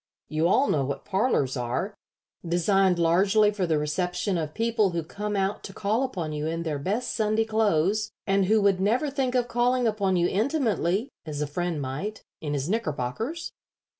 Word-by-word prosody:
You 155 +2 +1
all 265 +10 +3
know 140 - +1
what 140 +1 -4
parlors 190 - +1
are 125 - -2 0.5
designed 180 +2 +2
largely 195 +5 +4
for 195 -4 -1
the 160 -2 +2
reception 180 +6 -1
of 155 -2 -3
people 225 -3 +2
who 170 -2 -2
come 205 +6 -4
out 195 +1 -1
to 195 - -8
call 215 +5 0
upon 180 -13 -3
you 150 +1 -2
in 165 +1 -2
their 155 -3 -2
best 210 - -2
Sunday 215 0 +1
clothes, 210 -1 +1 0.2
and 195 -1 +2
who 215 +2 +3
would 195 -2 +3
never 245 +9 +1
think 260 -2 -1
of 245 -1 +2
calling 245 +1 +1
upon 200 -4 +1
you 175 0 +3
intimately, 220 - 0 0.2
as 150 -2 -4
a 150 - 0
friend 170 +2 -2
might, 150 +12 -5 0.2
in 150 -2 -3
his 140 +1 -2
knickerbockers. 220 - -2
195 Hz, 180 wpm, -26 LUFS, 165-220 Hz, 0.5 s, largely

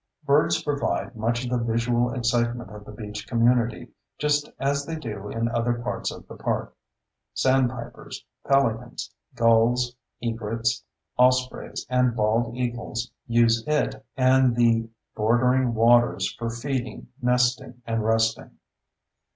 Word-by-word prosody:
Birds 145 +1 +3
provide 145 -3 -2
much 115 +2 -1
of 125 - -4
the 125 - +1
visual 120 +1 +1
excitement 120 -2 -1
of 105 -1 -10
the - - -10
beach 105 0 -7
community, 120 -1 +1 0.3
just 150 0 +1
as 140 +1 0
they 165 +3 -5
do 105 -9 -6
in 115 +1 -1
other 120 +1 0
parts 120 +1 -3
of - - -11
the - - -10
park. - - -3 0.6
Sandpipers, 130 -2 -1 0.2
pelicans, 125 -4 0 0.2
gulls, 115 +2 +3 0.2
egrets, 115 0 -2 0.4
ospreys, 125 0 +1
and 125 -1 +2
bald 115 +2 +1
eagles 120 -1 -3 0.2
use 115 -1 +3
it 150 -1 0
and 130 -1 +4
the 115 -1 +2 0.3
bordering 120 +3 +2
waters 120 +2 +3
for 115 -1 -4
feeding, 125 +1 -4
nesting, 125 0 +1
and 115 -1 -1
resting. 110 0 0
120 Hz, 125 wpm, -25 LUFS, 115-125 Hz, 0.6 s, and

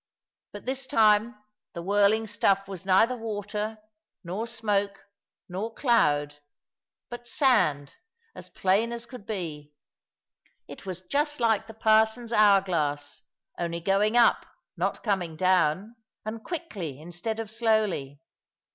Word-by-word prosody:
But 205 - -10
this 265 +1 -3
time 220 0 +3 0.4
the 170 - -6
whirling 205 +3 +3
stuff 195 -2 +1
was 195 -1 -8
neither 220 +7 +4
water, 215 -1 -4 0.5
nor 190 +7 -4
smoke, 205 -4 -1 0.4
nor 205 +5 -5
cloud; 145 - +2 0.7
but 240 0 -8
sand, 205 - +2 0.4
as - - -10
plain 200 +5 +1
as 235 0 -6
could 235 -4 -12
be. 150 -8 -5 0.9
It - - -11
was 185 -1 -5
just 295 - -1
like 225 -3 +1
the 225 - -11
parson's 220 +2 +2
hour 205 -3 +6
glass 145 -6 -2 0.4
only 170 -1 -2
going 200 +6 +2
up, 240 - +4 0.3
not - - -2
coming 185 -7 -1
down, 185 +4 +1 0.3
and 220 +1 -5
quickly 200 - -5
instead 175 +8 -5
of 220 -2 -5
slowly. 215 - 0
205 Hz, 125 wpm, -27 LUFS, 180-225 Hz, 0.9 s, hour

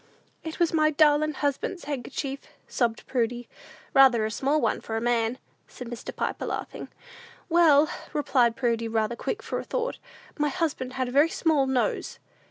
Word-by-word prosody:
"It 320 -1 -6
was 340 -2 +2
my 310 -1 +4
darlin' 305 0 +3
husband's 290 +6 -2
handkerchief," 275 0 -4 0.3
sobbed 235 -2 -1
Prudy. 240 -1 -2 0.5
"Rather 255 -5 +6
a 220 - -2
small 275 +7 +1
one - - 0
for 225 - -4
a - - 0
man," 235 0 0 0.3
said 250 - -9
Mr. 240 - -7
Piper, - - -3
laughing. - - -5 0.6
"Well," 315 -3 +5 0.2
replied 255 -5 +2
Prudy, 230 -3 0
rather 225 0 0
quick 445 - -4
for - - -3
a - - -5
thought, - - -3 0.4
"my 295 0 +2
husband 295 -7 -2
had 260 -1 -1
a - - -5
very 290 +5 +4
small 310 -5 +1
nose!" 260 -2 -1
270 Hz, 165 wpm, -26 LUFS, 240-305 Hz, 0.6 s, Rather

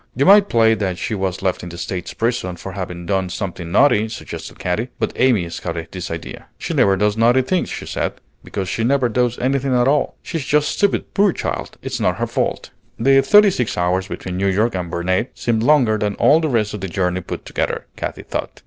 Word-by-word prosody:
"You 135 - +2
might 200 +1 +7
play 115 -1 +4
that 95 -5 -2
she 110 - -3
was 95 -2 -2
left 95 -2 0
in 90 - -7
the 85 - -9
States 90 0 -4
prison 115 -6 -1
for 95 +3 -8
having 90 -2 -6
done 95 -1 0
something 90 -2 -5
naughty," 110 -2 +4
suggested 115 - -8
Katy; 105 +8 -2
but - - -2
Amy 120 -9 +2
scouted 85 -1 -5
this 90 -2 -6
idea. 80 0 -7
"She - - -4
never 95 -1 +3
does 105 +1 +1
naughty 120 +3 +4
things," 180 +7 0
she - - -6
said, - - -2 0.3
"because 95 -2 -4
she 115 - -2
never 130 0 +2
does 125 +1 0
anything 135 0 0
at 120 - +3
all. 145 0 +1
She's 165 -4 -4
just 150 +2 +2
stupid, 200 -1 0
poor 200 -1 +4
child! - - -4
It's - - -3
not - - +1
her - - 0
fault." - - -2 0.3
The 135 +3 +5
thirty 205 +8 +6
six 125 -10 -2
hours 90 +2 0
between 90 -1 -5
New 100 +1 +1
York 105 +5 +1
and 90 -2 -3
Burnet 95 +7 -1
seemed 115 -2 0
longer 120 -5 +3
than 105 -1 -1
all 155 - +5
the 160 -2 -1
rest 110 -5 0
of 105 - -5
the 95 - -3
journey 90 0 -1
put - - -7
together, - - -2
Katy - - -5
thought. - - -5
110 Hz, 220 wpm, -20 LUFS, 90-130 Hz, 0.3 s, might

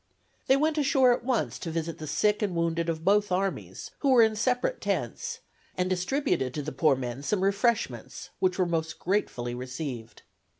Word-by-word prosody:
They 265 - +5
went 310 +2 +1
ashore 265 -3 +4
at 240 - -3
once 250 -2 -1
to 170 - -5
visit 165 0 -3
the 155 - -6
sick 210 +8 +1
and 200 -4 -1
wounded 170 0 0
of 160 0 -3
both 205 0 +3
armies, 190 +2 -2
who 280 - +1
were 250 -3 +7
in 220 -1 +2
separate 250 - 0
tents, 470 0 -3 0.4
and 180 0 0
distributed 185 - 0
to 150 - -3
the 150 - -4
poor 155 -3 +3
men 125 0 -5
some 185 +7 0
refreshments, 195 - -1
which 185 -1 +1
were 185 - +2
most 165 -2 -2
gratefully 125 -11 -1
received. 125 -2 -6
180 Hz, 180 wpm, -28 LUFS, 155-230 Hz, 0.4 s, were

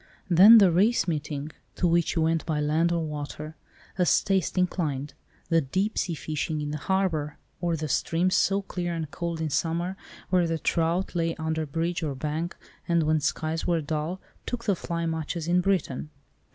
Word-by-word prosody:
Then 200 +7 +9
the 195 -5 +6
race 200 +8 +3
meeting, 150 -2 -3 0.2
to - - 0
which 170 0 +2
you 165 - +2
went 165 0 +1
by 155 -2 0
land 155 +3 +2
or 170 -1 0
water, 150 +1 -6 0.4
as 180 - +4
taste 190 -2 0
inclined. 150 -6 -1 0.4
The 165 -1 +4
deep 190 +10 -1
sea 170 - -1
fishing 155 +1 -3
in 150 0 -3
the 150 - -3
harbour, 165 -5 -1 0.2
or 170 -1 0
the 155 0 -3
streams 170 +6 +1
so 195 +1 +2
clear 175 -2 -3
and 160 -3 -4
cold 170 0 -3
in 160 -2 -2
summer, 170 +5 -1 0.4
where 180 -2 +3
the 165 0 -1
trout 170 +4 0
lay 165 -2 0
under 160 -1 -2
bridge 165 +4 -2
or 150 -4 -2
bank, 155 +5 -3 0.3
and 170 -2 +3
when 155 0 +2
skies 160 +2 -2
were 170 -2 +2
dull, 155 +4 -3 0.3
took 240 -1 -4
the 200 - +2
fly 170 -1 -3
much 160 +1 -2
as 165 -1 -4
in 180 +1 +3
Britain. 175 -7 -1
165 Hz, 185 wpm, -27 LUFS, 155-175 Hz, 0.4 s, Then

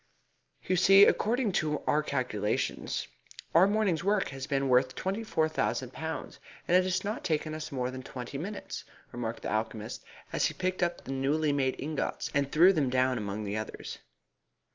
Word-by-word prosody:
"You 185 - +1
see, 195 +3 +8
according 235 0 +2
to 150 -1 -2
our 150 - +3
calculations, 125 -8 -2 0.5
our 175 +4 +7
morning's 200 -5 +1
work 200 0 +1
has 135 0 -6
been 140 -2 0
worth 130 0 +3
twenty 195 +4 -2
four 160 -8 +1
thousand 130 -5 -2
pounds, 160 0 -5 0.3
and 175 - +3
it 185 0 +5
has 185 0 0
not 210 +3 -3
taken 155 -1 -1
us 155 +1 -5
more 125 -2 -2
than 130 0 -6
twenty 130 +1 -7
minutes," 200 +6 -6 0.3
remarked 115 -1 -4
the - - -3
alchemist, 110 0 -3 0.3
as - - +2
he - - -6
picked 185 0 -2
up 175 0 0
the - - -6
newly 145 +3 +1
made 135 -2 +1
ingots, 150 +1 -3
and 140 -1 +1
threw 175 +5 +7
them 145 -7 +1
down 130 0 +2
among 105 0 -4
the 100 0 -3
others. 110 - -6
150 Hz, 180 wpm, -30 LUFS, 130-185 Hz, 0.5 s, see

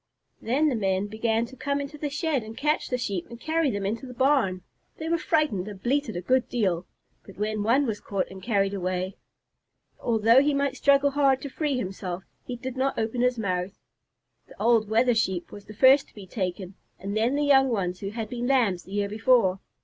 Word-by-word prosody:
Then 270 +7 +1
the - - -1
men 195 -2 0
began 220 +2 0
to 265 - -13
come 280 +2 -2
into 280 +2 -6
the 295 0 -3
shed 300 -2 -1
and 220 +1 -10
catch 300 +2 0
the 250 - -1
Sheep 200 -7 -3
and 235 - -10
carry 315 +2 +1
them 200 -4 -3
into 230 +6 -3
the 250 - -10
barn. 235 -9 +2 0.3
They 320 - -5
were 335 0 +1
frightened 300 - 0
and 205 -2 -8
bleated 255 -1 -1
a 175 - -3
good 255 +4 +1
deal, 185 -7 0 0.4
but 195 - -14
when 215 +1 -1
one 245 +7 +3
was 220 -4 -2
caught 195 -2 -2
and 190 0 -10
carried 200 -2 +1
away, 185 0 -2 0.8
although 230 +2 +4
he 290 0 +1
might 280 -1 0
struggle 280 0 +3
hard 275 -2 +3
to 280 - -4
free 290 -1 -1
himself, 185 -4 -4 0.2
he 250 - -5
did 260 +1 -6
not 270 +1 0
open 225 +2 -1
his 250 0 +2
mouth. 185 -2 -2 0.7
The - - -17
old 225 -3 +3
Wether 235 +3 +3
Sheep 190 -6 -1
was 205 - -11
the 215 - -11
first 265 +4 +6
to - - -26
be 205 -2 -10
taken, 185 -1 -4 0.2
and 200 +2 -5
then 230 +5 +1
the 295 - +1
young 270 -2 +5
ones 185 -6 -1
who 195 - -4
had 220 +1 -4
been 245 +2 -4
Lambs 230 -10 +2
the 190 - -11
year 205 0 0
before. 215 -3 +3
230 Hz, 215 wpm, -26 LUFS, 200-270 Hz, 0.8 s, first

